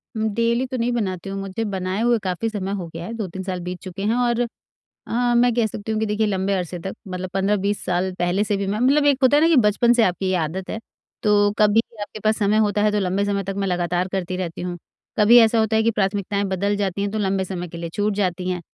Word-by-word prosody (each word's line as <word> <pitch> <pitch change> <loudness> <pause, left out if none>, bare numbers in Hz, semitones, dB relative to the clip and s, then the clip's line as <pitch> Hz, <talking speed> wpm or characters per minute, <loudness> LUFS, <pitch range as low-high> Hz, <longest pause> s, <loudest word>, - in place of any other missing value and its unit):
उम, 220 0 0
daily 235 +3 +1
तो 255 - -4
नहीं 240 +1 0
बनाती 195 -5 -2
हूँ, 195 0 -4
मुझे 195 +3 -4
बनाए 190 0 -2
हुए 240 0 +3
काफ़ी 185 +4 -1
समय 195 -3 -4
हो 185 -4 -4
गया 165 +1 -6
है। 225 - -6
2-3 190 -4 -5
साल 185 -1 -3
बीत 180 +1 -5
चुके 185 +1 -7
हैं 220 +3 +1
और 240 -1 +1 0.6
अ, 240 +1 +1
मैं 240 0 +4
कह 235 -2 +2
सकती 210 +1 -6
हूँ 215 - 0
कि 220 - 0
देखिए 210 +1 0
लंबे 195 0 0
अरसे 180 -2 -2
तक 190 +3 -5
मतलब 185 0 -5
15-20 200 +1 0
साल 180 +1 0
पहले 175 +3 +1
से 205 -1 -1
भी 200 - -2
मैं 205 +2 -1
मतलब 280 +4 +3
एक 285 -2 +4
होता 265 +3 +6
है - - +4
ना 325 - +5
कि 330 - +5
बचपन 215 +3 +3
से 240 -1 +4
आपकी 185 0 0
ये 185 - +1
आदत 175 +3 -3
है। 220 - -3 0.4
तो 205 -1 +4
कभी 210 +1 +5 0.2
आपके 205 +1 -6
पास 215 0 +2
समय 210 +1 +2
होता 205 0 0
है 210 - +3
तो 210 - +1
लंबे 190 +1 0
समय 200 -1 -1
तक 195 +1 -4
मैं 200 -1 -1
लगातार 175 0 0
करती 185 -1 -2
रहती 175 -3 -4
हूँ। 175 0 -4 0.4
कभी 220 +3 +7
ऐसा 225 0 +4
होता 220 0 +1
है 220 - +3
कि 230 - +3
प्राथमिकताएँ 200 -1 -1
बदल 200 +2 0
जाती 200 -1 -1
हैं 200 0 -1
तो 220 - -3
लंबे 195 -1 0
समय 180 -1 -5
के 170 - -9
लिए 170 0 -5
छूट 210 0 0
जाती 185 -2 -1
हैं। 180 -1 -2
200 Hz, 260 wpm, -22 LUFS, 185-220 Hz, 0.6 s, कभी